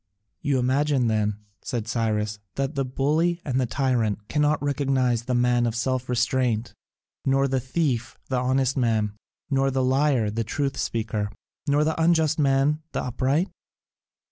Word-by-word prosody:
"You 140 -3 +1
imagine 130 +1 +2
then," 105 -1 0 0.2
said 115 -3 -3
Cyrus, 110 -3 -1 0.2
"that 135 +2 -1
the 140 - 0
bully 155 +7 +1
and 130 -3 0
the 125 - 0
tyrant 115 -6 0
cannot 150 0 +2
recognise 135 -4 +1
the 125 -1 0
man 120 0 +3
of 115 - -2
self 130 +1 -1
restraint, 120 -1 0 0.5
nor 135 0 +2
the 135 0 0
thief 130 -3 -1
the 130 -2 0
honest 130 +1 +1
man, 110 -5 +1 0.4
nor 135 0 +3
the 130 -1 0
liar 130 -4 +2
the 115 +2 -1
truth 135 +5 -2
speaker, 110 -2 -2 0.4
nor 145 +1 +3
the 160 +1 0
unjust 160 -2 +3
man 140 +2 +2
the - - -1
upright? 135 - 0
130 Hz, 150 wpm, -25 LUFS, 120-140 Hz, 0.5 s, man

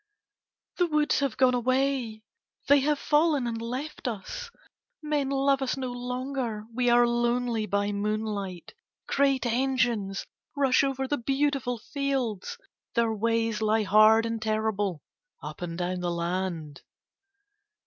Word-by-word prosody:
"The 355 - +3
woods 300 -2 +2
have 275 -5 -1
gone 255 -1 +4
away, 255 -2 0 0.4
they 285 0 +6
have 295 +2 +1
fallen 295 -2 +2
and 230 -1 -3
left 260 +6 -5
us; 240 - -5 0.5
men 295 -3 0
love 275 0 +2
us 265 0 -1
no 260 -2 -3
longer, 245 -2 -4
we 245 +1 +1
are 240 0 +6
lonely 240 -2 0
by 200 +1 0
moonlight. 205 -3 -3 0.3
Great 275 -2 +2
engines 240 -5 0 0.3
rush 270 -1 +4
over 270 -1 -1
the 290 +2 -1
beautiful 270 -1 0
fields, 270 - -3 0.4
their 230 -2 +2
ways 225 0 0
lie 220 0 +2
hard 215 +2 +6
and 230 -1 -3
terrible 215 -6 -1 0.4
up - - -8
and 170 -1 -4
down 180 0 -2
the 175 0 -2
land. 170 -3 -3
240 Hz, 130 wpm, -27 LUFS, 215-270 Hz, 0.5 s, they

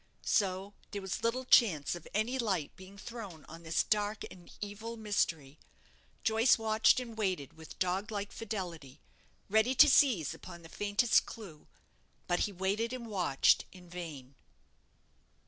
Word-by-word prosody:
So 195 -1 0 0.2
there 205 - -5
was 190 - -3
little 250 +3 0
chance 180 - +4
of 175 -2 -8
any 230 +5 0
light 190 - -1
being 190 +1 -13
thrown 200 -8 -9
on 165 +1 -11
this 165 0 0
dark 210 0 0
and 175 -2 -14
evil 215 +3 -6
mystery. 165 -9 -1 0.6
Joyce 225 +3 +4
watched 220 +1 +3
and 235 -3 -7
waited 185 -9 -2
with 160 -1 -12
dog 185 +3 -1
like 205 -2 -4
fidelity, 175 - -6 0.5
ready 220 +5 +3
to 300 - +9
seize 255 - +4
upon 170 -2 -11
the 165 - -12
faintest 205 +5 +2
clue; 185 -10 -10 0.6
but 175 - 0
he 205 - 0
waited 200 +5 -1
and 250 -2 -5
watched 180 -10 +2
in 180 -2 -15
vain. 150 -7 -8
200 Hz, 145 wpm, -32 LUFS, 170-220 Hz, 0.6 s, to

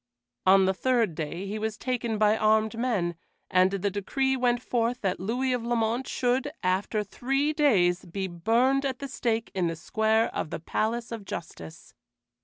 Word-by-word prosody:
On 190 0 +7
the 190 - +2
third 235 -2 +1
day 165 +4 -4
he 210 +2 -4
was 220 0 -3
taken 240 -3 -2
by 210 0 +4
armed 220 +1 +2
men, 220 -8 0 0.4
and 185 0 +5
the 195 +1 -1
decree 265 +7 0
went 245 -1 +1
forth 240 0 -1
that 190 -2 -1
Louis 250 +7 -1
of 245 -2 -2
Lamont 235 +1 0
should, 255 +3 0
after 195 +4 0
three 275 +8 -1
days, 190 - +3
be 190 +2 -4
burned 230 +10 +2
at 265 -2 -2
the 280 - -6
stake 230 -3 -2
in 185 -3 0
the 165 - -2
square 220 +7 +1
of - - -3
the - - -4
Palace 230 +8 -2
of 225 -3 -5
Justice. 85 - -8
220 Hz, 175 wpm, -27 LUFS, 190-245 Hz, 0.4 s, On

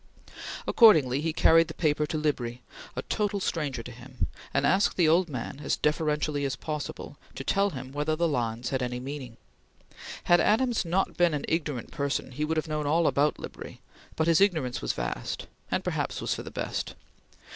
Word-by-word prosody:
Accordingly 150 - +6
he 165 +1 0
carried 165 +1 +5
his - - -7
paper 150 -2 +1
to 155 - -2
Libri, 125 -5 -2 0.3
a 125 - -3
total 205 -1 -1
stranger 145 -10 -2
to 120 - -8
him, 125 +2 -5 0.3
and 135 0 +1
asked 195 +6 +3
the 170 -3 +4
old 170 +2 +4
man, 135 0 -5
as - - 0
deferentially 150 -1 0
as 135 -1 -1
possible, 150 -2 -5 0.2
to - - -5
tell 200 +1 +2
him 130 -6 -7
whether 150 +2 0
the 170 +1 +1
lines 120 -4 -1
had 130 -1 0
any 125 0 -2
meaning. 130 -3 -7 0.9
Had 175 0 +5
Adams 235 +1 +2
not 180 +3 0
been 175 -3 +3
an 145 - -3
ignorant 150 -7 -2
person 140 -2 -2
he 150 +4 -3
would 160 +1 -1
have 155 - -1
known 150 -1 -2
all 165 +3 +3
about 145 +1 +2
Libri, - - -9 0.4
but 160 - +1
his 165 +2 +4
ignorance 160 -11 +2
was - - -1
vast, - - -4 0.2
and - - 0
perhaps - - -2
was - - -1
for - - -4
the - - -8
best. - - -4
150 Hz, 190 wpm, -28 LUFS, 130-165 Hz, 0.9 s, Accordingly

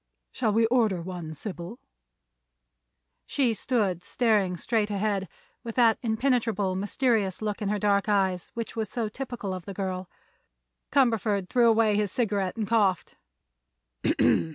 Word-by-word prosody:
"Shall 215 - 0
we 225 +2 +3
order 225 -6 +2
one, 170 -2 -6
Sybil?" 180 +4 -7 1.5
She 255 -5 +1
stood 205 -6 0
staring 205 -4 +1
straight 215 +2 0
ahead, 200 -2 -1 0.3
with 230 -2 -6
that 230 -3 +4
impenetrable, 225 -5 0
mysterious 205 -1 0
look 215 0 -3
in 205 - -1
her 210 - 0
dark 200 0 +1
eyes 190 -4 +1
which 230 -2 -5
was 220 -2 -2
so 230 -3 -2
typical 240 -5 -5
of 185 -2 -6
the 195 - -7
girl. 185 -2 -3 0.8
Cumberford 220 -7 +2
threw 240 -2 +4
away 220 -2 +3
his 205 -2 0
cigarette 205 -5 -1
and 215 -2 -2
coughed. 205 -6 +1
210 Hz, 135 wpm, -27 LUFS, 190-230 Hz, 1.5 s, that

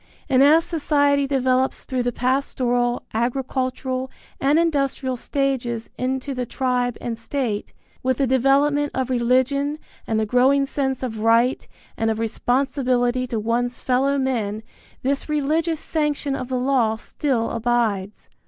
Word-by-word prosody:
And 265 -3 +4
as 310 +4 +6
society 285 -3 +2
develops 260 -1 +1
through 255 -1 -1
the 245 0 0
pastoral, 245 -1 0
agricultural 255 +2 -2 0.3
and 280 +3 +3
industrial 275 -5 0
stages 245 -3 -2
into 265 +2 -2
the 250 -2 -3
tribe 250 -2 -1
and 230 -1 -4
state, 230 -3 -3 0.3
with 260 -1 0
the 275 - +2
development 280 +3 +2
of 260 -1 -1
religion 260 +4 +1 0.3
and 220 -1 +1
the 220 - +1
growing 260 +5 +3
sense 265 -2 -2
of 225 -4 -4
right 230 +3 +2 0.3
and 225 - +1
of 220 - 0
responsibility 250 +2 0
to 230 -2 -2
one's 240 +3 -1
fellow 270 +2 +1
men, 225 -6 -1 0.4
this 275 +3 -1
religious 310 +2 0
sanction 295 -3 -1
of 255 - -4
the 255 0 -1
law 250 -4 +2
still 240 +1 -2
abides. 225 -4 -1
255 Hz, 135 wpm, -22 LUFS, 240-275 Hz, 0.4 s, as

